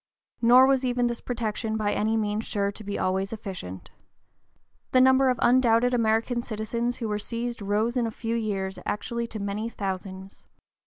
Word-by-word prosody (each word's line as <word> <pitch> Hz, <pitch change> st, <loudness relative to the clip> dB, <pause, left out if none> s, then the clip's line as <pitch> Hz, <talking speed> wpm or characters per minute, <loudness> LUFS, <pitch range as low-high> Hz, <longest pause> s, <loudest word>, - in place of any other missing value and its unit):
Nor 245 Hz, +2 st, +7 dB
was 270 Hz, -1 st, +2 dB
even 245 Hz, -1 st, +1 dB
this 235 Hz, -1 st, -2 dB
protection 220 Hz, -2 st, -2 dB
by 210 Hz, -1 st, 0 dB
any 220 Hz, +1 st, +1 dB
means 210 Hz, 0 st, -1 dB
sure 200 Hz, -1 st, -1 dB
to 215 Hz, -, -12 dB
be 205 Hz, 0 st, -4 dB
always 190 Hz, +1 st, 0 dB
(p. 225 Hz, -, -4 dB
044) -, -, -13 dB
efficient. 95 Hz, -, -8 dB, 1.0 s
The 255 Hz, -, +6 dB
number 260 Hz, +1 st, +5 dB
of 250 Hz, -, +1 dB
undoubted 245 Hz, 0 st, +4 dB
American 230 Hz, +1 st, +1 dB
citizens 235 Hz, +2 st, -3 dB
who 230 Hz, -, -3 dB
were 210 Hz, -1 st, -1 dB
seized 235 Hz, +1 st, -4 dB
rose 210 Hz, +4 st, 0 dB
in 240 Hz, -2 st, +1 dB
a -, -, -2 dB
few 225 Hz, +1 st, -3 dB
years 195 Hz, -4 st, -2 dB
actually 235 Hz, +3 st, -2 dB
to 220 Hz, -, -7 dB
many 205 Hz, +2 st, -3 dB
thousands. 190 Hz, -2 st, -6 dB
225 Hz, 180 wpm, -26 LUFS, 205-240 Hz, 1.0 s, Nor